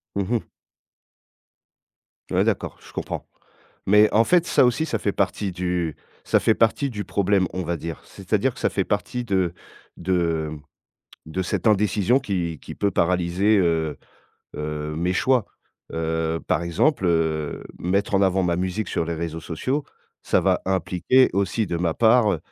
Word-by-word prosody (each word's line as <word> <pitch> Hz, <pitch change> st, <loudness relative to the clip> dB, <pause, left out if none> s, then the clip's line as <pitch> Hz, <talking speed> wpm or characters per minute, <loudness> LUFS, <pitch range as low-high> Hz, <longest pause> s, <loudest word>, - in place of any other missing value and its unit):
Mmh 100 Hz, +3 st, -2 dB
mh. 115 Hz, -, -1 dB, 1.8 s
Ouais -, -, +3 dB
d'accord, -, -, -1 dB
je -, -, -14 dB
comprends, -, -, -5 dB, 0.6 s
mais 105 Hz, +2 st, +6 dB
en 110 Hz, -, +5 dB
fait 175 Hz, +6 st, +3 dB
ça -, -, +4 dB
aussi 125 Hz, +6 st, +2 dB
ça 150 Hz, -, -2 dB
fait 100 Hz, -, 0 dB
partie 100 Hz, 0 st, -1 dB
du 90 Hz, -3 st, -2 dB, 0.3 s
ça -, -, +3 dB
fait 110 Hz, -, +3 dB
partie 115 Hz, +6 st, +2 dB
du 105 Hz, -5 st, -5 dB
problème 95 Hz, -1 st, +1 dB
on 95 Hz, -, -3 dB
va 85 Hz, +1 st, -1 dB
dire, 85 Hz, +1 st, -6 dB
c'est-à-dire -, -, -1 dB
que -, -, -11 dB
ça -, -, +1 dB
fait -, -, 0 dB
partie 125 Hz, -1 st, -2 dB
de 95 Hz, -5 st, 0 dB, 0.4 s
de 85 Hz, -3 st, 0 dB, 0.7 s
de 85 Hz, +4 st, -3 dB
cette 90 Hz, -, -2 dB
indécision 105 Hz, +4 st, +3 dB
qui 85 Hz, -, -3 dB
qui -, -, -9 dB
peut 100 Hz, -1 st, 0 dB
paralyser, 90 Hz, +5 st, +2 dB
heu 80 Hz, -4 st, +1 dB, 0.6 s
heu, 75 Hz, 0 st, -4 dB
mes 90 Hz, +3 st, 0 dB
choix, 125 Hz, +3 st, +2 dB, 0.4 s
heu, 80 Hz, 0 st, -1 dB
par -, -, +1 dB
exemple, 90 Hz, -, +1 dB
heu, 80 Hz, -3 st, 0 dB, 0.2 s
mettre 100 Hz, +4 st, 0 dB
en 100 Hz, -, +4 dB
avant 95 Hz, -1 st, +2 dB
ma 85 Hz, -1 st, +1 dB
musique 95 Hz, +3 st, -2 dB
sur 80 Hz, -, -1 dB
les 85 Hz, -, -3 dB
réseaux 80 Hz, 0 st, -4 dB
sociaux, 130 Hz, -, -2 dB, 0.4 s
ça -, -, +2 dB
va -, -, +1 dB
impliquer 95 Hz, +7 st, +2 dB
aussi 100 Hz, +3 st, 0 dB
de 85 Hz, -3 st, -2 dB
ma 85 Hz, -1 st, 0 dB
part 110 Hz, -5 st, +4 dB
95 Hz, 165 wpm, -23 LUFS, 85-105 Hz, 1.8 s, mais